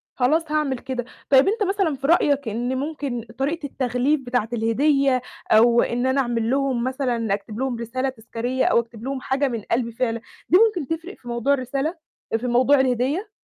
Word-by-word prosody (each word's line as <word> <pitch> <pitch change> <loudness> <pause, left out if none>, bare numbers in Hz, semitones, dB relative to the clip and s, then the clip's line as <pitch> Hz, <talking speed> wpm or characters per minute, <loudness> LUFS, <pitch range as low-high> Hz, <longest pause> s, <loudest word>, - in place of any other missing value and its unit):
خلاص 300 +5 +1
هاعمل 300 -4 0
كده. 255 -2 -4 0.2
طيب 270 +2 +6
أنت 425 +2 +1
مثلًا 390 -6 0
في 275 +1 -4
رأيك 285 -5 +3
إن 245 +4 -2
ممكن 280 -4 -3
طريقة 295 +3 -2
التغليف 260 +2 0
بتاعة 245 -3 -1
الهدية 260 +3 +2 0.3
أو 235 +2 +6
إن 245 +2 -1
أنا 265 +1 +2
أعمل 235 -2 -1
لهم 265 -3 +1
مثلًا 250 -5 -1
أكتب 210 +3 -5
لهم 260 -3 -1
رسالة 255 +3 -2
تذكاريّة 245 +1 -3
أو - - +4
أكتب 230 -1 -7
لهم 265 0 -3
حاجة 275 +2 0
من 235 -4 -3
قلبي 235 0 +1
فعلًا، 230 -1 -2 0.3
دي 360 - +7
ممكن 415 - +2
تفرق 355 +5 -11
في 245 - -17
موضوع 235 +4 +1
الرسالة 275 +5 -2 0.4
آآ - - +4
في 250 - -4
موضوع 255 +4 +4
الهدية؟ 265 - 0
260 Hz, 185 wpm, -23 LUFS, 235-280 Hz, 0.4 s, دي